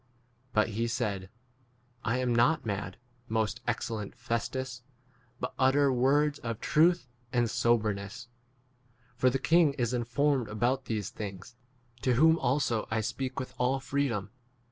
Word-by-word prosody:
But 110 0 +2
he 115 +2 -1
said,p 105 -6 -2 0.8
I 120 +3 0
am 125 -1 +1
not 125 +5 +3
mad, 100 -3 -3 0.3
most 110 +1 0
excellent 110 -3 -3
Festus, 125 +2 -3 0.6
but 125 - -3
utter 135 +1 +4
words 145 +4 +2
of 115 -2 -4
truth 170 0 +3 0.2
28 125 - +1
and 120 -1 +2
soberness; 110 0 0 0.9
for 130 +2 +3
the 130 - 0
king 155 +3 +4
is 120 -3 -1
informed 125 +2 +1
about 125 +5 0
these 110 -4 -3
things, 100 +3 -7 0.5
to 130 - +2
whom 160 +6 +5
also 125 -3 +1
I 110 0 0
speak 130 +4 -3
with 130 - -6
all 130 +2 +2
free 140 +1 0
dom. 105 -5 -3
120 Hz, 145 wpm, -30 LUFS, 110-135 Hz, 0.9 s, whom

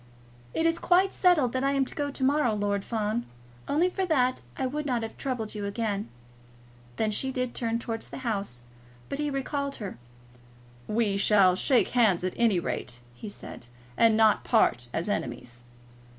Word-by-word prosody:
"It 325 - +1
is 330 0 +2
quite 370 +2 +3
settled 320 -10 +3
that 260 0 0
I 275 0 +2
am 275 -1 +2
to - - -6
go 290 -1 -2
to 275 -1 -5
morrow, 265 -4 +3
Lord 200 -1 -1
Fawn. 220 +1 -1 0.4
Only 320 +5 +3
for 380 +1 -2
that 255 -6 +2 0.2
I 265 - -1
would 295 +3 -3
not 245 -4 0
have 225 - -6
troubled 245 -5 -3
you 210 -1 -4
again." 205 -1 -2 0.9
Then 220 -1 0
she 265 +5 -1
did 255 -1 -2
turn 230 -1 -1
towards 225 -1 -4
the - - -7
house, 200 - -2 0.5
but 275 - -4
he 295 0 0
recalled 280 0 -2
her. 200 - -7 0.9
"We 210 -3 +1
will 195 -4 +6
shake 255 +6 +2
hands, 215 -8 +3
at 185 - -1
any 225 -6 +3
rate," 125 -7 -4
he 205 - -8
said, 120 - -9 0.3
"and 225 -1 +4
not 220 -1 +4
part 120 - +2
as 165 - -2
enemies." 120 - -4
230 Hz, 180 wpm, -27 LUFS, 205-275 Hz, 0.9 s, will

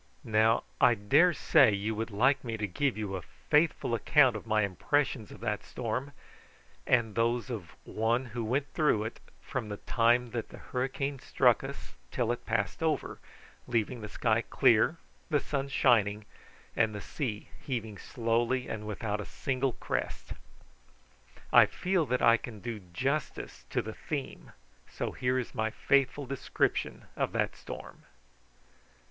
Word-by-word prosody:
Now, 110 +1 +3 0.2
I 120 - +6
daresay 140 - +4
you 105 +3 -2
would 110 +2 -3
like 130 +6 +2
me 115 -3 -3
to 105 - -1
give 120 +7 -1
you 105 -3 -3
a 95 - -4
faithful 150 - 0
account 130 +2 +4
of 110 - -7
my 110 -1 +3
impressions 115 +4 0
of - - -12
that 105 -3 -2
storm, 125 +4 -4 0.7
and 115 -4 +3
those 120 +3 0
of 100 -8 -6
one 115 +4 0
who 120 -1 -2
went 135 +5 -1
through 150 -9 +2
it 110 - -6 0.2
from 120 -5 -4
the 105 - -4
time 120 +2 +2
that 115 -2 -4
the - - -11
hurricane 135 +2 -3
struck - - +3
us - - -8 0.2
till 120 - 0
it 120 - -5
passed 110 +2 -1
over, 160 -1 -1 0.5
leaving 120 0 -1
the 105 - -6
sky 110 +1 +1
clear, 125 +6 +3 0.3
the 150 -3 +3
sun 140 -1 -2
shining, 105 -6 +3 0.5
and 110 -2 +2
the - - -4
sea 115 -8 -4
heaving 110 -6 -4
slowly 120 +1 0
and 105 -1 -5
without 105 0 -3
a - - -6
single 130 -1 -1
crest. - - -4 1.2
I - - +8
feel 180 -4 0
that 125 +1 0
I 115 0 +7
can 115 -2 -8
do 115 0 -5
justice 135 - -3
to - - 0
the - - -6
theme, - - -6 0.4
so - - -3
here 125 0 0
is 125 - -3
my 110 0 0
faithful 140 +4 +1
description 135 0 -1
of - - -1
that - - 0
storm. - - -10
120 Hz, 155 wpm, -30 LUFS, 110-135 Hz, 1.2 s, I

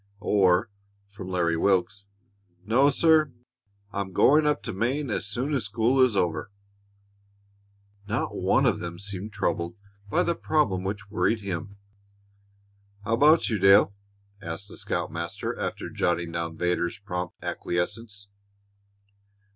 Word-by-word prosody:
or, 100 0 +3 0.3
from 100 -1 -10
Larry 85 -2 +1
Wilks, 95 +2 +1 0.6
"No, 130 +7 +4
sir; 155 0 +4 0.6
I'm 95 -1 -3
going 150 +9 +5
up 150 - +1
to - - -4
Maine 125 +6 -1
as 100 - -2
soon 125 +9 -2
as 130 -6 0
school 115 +5 +2
is 125 -6 +4
over." 80 -3 0 1.6
Not 110 +2 -2
one - - +2
of - - +2
them 85 0 -6
seemed 100 +2 -6
troubled 85 -2 -2 0.3
by - - +2
the 170 - +1
problem 115 - 0
which 100 +1 -5
worried 110 +1 +1
him. 100 0 -5 1.3
"How 115 - 0
about 150 +7 +5
you, 105 - 0
Dale?" 95 +1 +6 0.5
asked 95 +3 -6
the - - -9
scoutmaster, 85 +1 -3
after - - -3
jotting 85 -1 0
down 85 -1 -4
Vedder's 90 -1 0
prompt 90 -3 -5
acquiescence. 100 +3 -3
100 Hz, 130 wpm, -26 LUFS, 90-115 Hz, 1.6 s, Dale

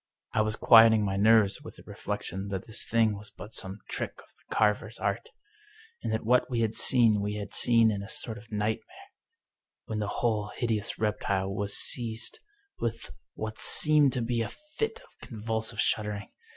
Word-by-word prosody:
I - - +3
was 110 0 0
quieting 115 -2 +6
my 95 -1 -1
nerves 105 0 +4
with - - -11
the - - -15
reflection 95 +3 -5
that 95 -2 -4
this 110 0 -3
thing 115 -2 +2
was 105 +1 -10
but 105 - -11
some 95 +2 -4
trick - - -4
of - - -15
the - - -9
carver's 110 +1 +1
art, 100 +3 -2 0.7
and - - -3
that 110 0 -2
what 125 +3 +3
we 120 -2 -1
had 110 -1 0
seen 115 -6 +4
we 105 +1 -2
had 105 -1 -6
seen 115 -2 +4
in 100 -1 -3
a 100 - -9
sort 110 -2 -3
of 115 +2 -18
nightmare, 110 - -4 0.7
when 110 -1 -4
the 105 - -2
whole 105 -2 -1
hideous 110 -4 -2
rep 105 -1 -1
tile 95 0 -1
was 100 0 -1
seized 115 -3 0 0.4
with 115 -1 -4 0.2
what 110 0 -5
seemed 150 -3 +4
to 125 - -1
be 115 0 -1
a 115 - -2
fit 435 +11 -5
of - - -16
convulsive 110 -1 -3
shuddering. 105 -2 0
110 Hz, 185 wpm, -28 LUFS, 105-115 Hz, 0.7 s, quieting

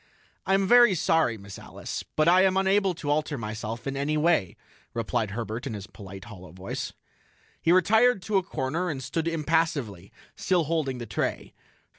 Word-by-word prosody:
"I 190 - +4
am 195 0 +1
very 240 -4 +7
sorry, 160 -7 +2
Miss 100 -1 -10
Alice, - - -6
but 155 +1 +3
I 180 +2 +6
am 190 0 +3
unable 195 -1 +2
to 145 -3 -3
alter 150 -1 0
myself 110 +1 -5
in 135 0 -3
any 145 +3 0
way," 155 - +1 0.4
replied 115 -1 -1
Herbert 115 +2 -4
in 110 - -4
his 100 -2 -7
polite, 95 -3 -11
hollow 95 -7 -11
voice. 95 +3 -5 0.7
He 165 - +3
retired 210 +4 +4
to 205 +1 +1
a - - +3
corner 165 +3 -2
and 135 -4 -4
stood 165 +5 -2
impassively, 155 - -1 0.2
still 180 -3 +1
holding 150 -4 -1
the 120 - -6
tray. 105 - -3
150 Hz, 175 wpm, -27 LUFS, 115-180 Hz, 0.7 s, very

